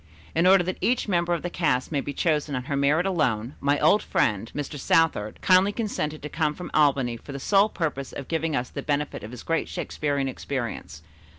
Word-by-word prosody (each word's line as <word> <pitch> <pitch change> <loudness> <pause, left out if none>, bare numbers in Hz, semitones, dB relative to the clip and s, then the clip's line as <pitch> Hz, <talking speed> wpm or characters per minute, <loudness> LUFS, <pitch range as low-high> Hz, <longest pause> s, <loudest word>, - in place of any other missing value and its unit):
In 165 +3 +3
order 190 -1 +6
that 185 +1 -4
each 245 -1 +1
member 175 -3 +1
of 170 -2 0
the 175 - -2
cast 140 -8 0
may 145 -3 0
be 145 - -5
chosen 150 -1 0
on 125 - -3
her 140 +2 -3
merit 145 +5 +2
alone, 130 - 0
my 145 +1 +2
old 210 - +4
friend, 105 +2 0
Mr. 145 0 -4
Southard, 150 -9 +1
kindly 185 +2 +5
consented 155 -10 -3
to - - -3
come 150 -1 -1
from 180 - -8
Albany 135 -5 +2
for 140 - -10
the 140 - -5
sole 200 +8 +3
purpose 150 -8 -3
of 135 - -7
giving 160 -2 -1
us 125 0 -2
the - - -5
benefit 145 0 -2
of 105 - -7
his 125 0 -9
great 165 0 -1
Shakespearian 140 -2 -2
experience. 120 - -5
150 Hz, 210 wpm, -25 LUFS, 135-170 Hz, -, order